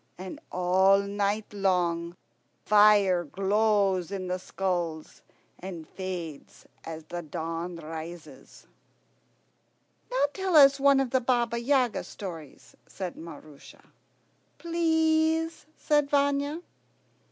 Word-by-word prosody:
And 185 0 -8
all 185 +2 +4
night 205 +1 -2
long 175 -3 0 0.5
fire 205 -4 +5
glows 195 +1 +1
in 185 -2 -4
the 180 0 -2
skulls 175 -5 -3 0.4
and 175 -4 -8
fades 175 -6 -7 0.2
as 160 -1 -7
the 175 +2 -6
dawn 165 +2 -5
rises." 165 +1 -10 1.4
"Now - - +2
tell 380 -3 -1
us 275 -2 +7
one 280 0 +5
of 265 -3 -1
the 260 - +2
Baba 235 -1 0
Yaga 255 -1 +1
stories," 165 -8 -10
said 185 -3 -6
Maroosia. 155 -3 -13 0.7
"Please," 320 -1 +1
said 295 -2 +1
Vanya. 285 +3 0
195 Hz, 100 wpm, -27 LUFS, 175-275 Hz, 1.4 s, us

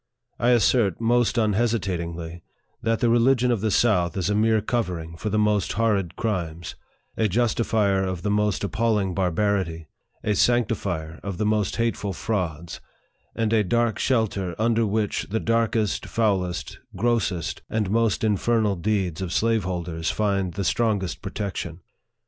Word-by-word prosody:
I 120 - +2
assert 115 -5 +3
most 120 +1 +2
unhesitatingly, 95 -7 -1 0.4
that 115 +1 0
the 120 - +3
religion 125 +1 +3
of 115 -5 0
the 110 - +1
south 100 -4 +2
is 95 +2 0
a - - +1
mere 110 +1 +3
covering 90 -8 -3
for 105 +6 -4
the 105 - 0
most 105 -1 +1
horrid 105 -5 0
crimes, 85 -7 -3 0.4
a 110 - +2
justifier 110 -2 +1
of 95 -2 -3
the 105 - 0
most 105 -2 +1
appalling 105 -2 0
barbarity, 90 -3 -1 0.3
a 105 - +1
sanctifier 100 -8 0
of 100 -3 -5
the 105 - 0
most 105 -2 +1
hateful 115 -4 -1
frauds, 85 -5 -3 0.5
and 115 -1 0
a 110 -2 +4
dark 115 +3 +1
shelter 100 -8 0
under, 115 0 +2
which 105 0 -1
the 110 +3 0
darkest, 115 -2 0
foulest, 95 -6 -1 0.2
grossest, 100 -5 -1
and 105 -3 -1
most 115 -2 +1
infernal 110 0 +2
deeds 95 -2 -1
of 90 -3 -3
slaveholders 90 -7 -1
find 100 -4 0
the 100 - -2
strongest 100 -3 0
protection. 90 -5 -5
105 Hz, 145 wpm, -24 LUFS, 90-115 Hz, 0.5 s, a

